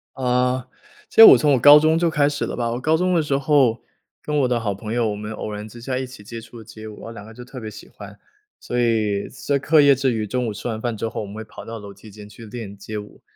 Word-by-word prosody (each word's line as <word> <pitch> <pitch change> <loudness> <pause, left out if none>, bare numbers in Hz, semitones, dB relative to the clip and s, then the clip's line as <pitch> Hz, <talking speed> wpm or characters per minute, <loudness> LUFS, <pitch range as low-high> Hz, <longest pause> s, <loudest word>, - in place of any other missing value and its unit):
呃， 125 0 0 0.4
其 - - -18
实 - - +13
我 - - +10
从 150 -2 +2
我 130 - +2
高 145 +4 +9
中 155 +1 +2
就 170 0 +1
开 150 -3 +2
始 145 - -3
了 - - -5
吧， 120 -1 -2
我 120 - -3
高 155 +5 +1
中 180 +2 0
的 170 - +3
时 140 -3 -1
候， 135 -5 +2 0.4
跟 150 - -3
我 135 - +2
的 125 -1 0
好 105 -3 -2
朋 105 +3 -7
友， 120 -2 0
我 105 - -3
们 105 +1 -7
偶 110 0 -6
然 105 +1 -7
之 120 +2 -13
下 130 +1 -3
一 130 - -3
起 125 -5 -13
接 115 +3 -8
触 115 +1 -14
了 - - -11
街 110 0 -11
舞， 105 - -9
然 - - -11
后 115 - -8
两 105 -3 -10
个 110 - -13
就 125 +2 -11
特 125 +1 -10
别 110 -2 -7
喜 110 0 -12
欢。 100 -1 -12 0.4
所 125 - -4
以 110 -4 0
在 140 +2 -2
课 150 +2 +4
业 140 -1 +6
之 135 -1 0
余， 110 -2 -2
中 125 +3 -2
午 110 - -3
吃 110 +4 -7
完 110 -2 -4
饭 120 -2 -3
之 115 - -3
后 110 - -5
我 - - -5
们 100 - -10
会 110 - -6
跑 110 - -12
到 115 0 -7
楼 100 -2 -10
梯 100 +3 -15
间 105 0 -12
去 105 +2 -13
练 105 -3 -8
街 105 +2 -7
舞， 105 0 -10
115 Hz, 330 characters per minute, -21 LUFS, 110-135 Hz, 0.4 s, 实